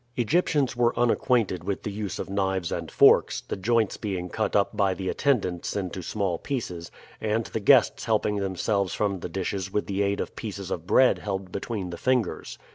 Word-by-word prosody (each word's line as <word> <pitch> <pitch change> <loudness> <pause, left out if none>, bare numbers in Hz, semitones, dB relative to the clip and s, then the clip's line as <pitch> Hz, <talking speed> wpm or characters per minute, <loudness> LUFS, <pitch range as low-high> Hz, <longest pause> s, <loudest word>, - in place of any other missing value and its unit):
Egyptians 140 +1 +1
were 120 0 +2
unacquainted 115 -6 +1
with 100 +1 -3
the 105 - -3
use 105 -1 -4
of - - -4
knives 95 -3 -1
and - - -3
forks, - - +5
the - - -5
joints 110 +2 +1
being 95 -4 -4
cut 110 - -2
up 100 +1 +2
by 100 -2 +2
the 95 0 -3
attendants 100 - 0
into 95 -2 -3
small 95 -1 -2
pieces, 90 -11 -4 0.3
and 110 +1 0
the - - -4
guests 120 +3 +4
helping 105 -2 +1
themselves 100 0 -1
from 100 -3 -1
the 85 - -6
dishes 95 +1 -3
with 105 - -1
the 100 0 -2
aid 100 0 0
of - - -4
pieces 100 -4 -6
of 85 0 -4
bread 130 +5 +4
held 95 -2 -4
between 100 -2 -4
the 85 - -6
fingers. 125 -6 -1
100 Hz, 190 wpm, -26 LUFS, 95-115 Hz, 0.3 s, forks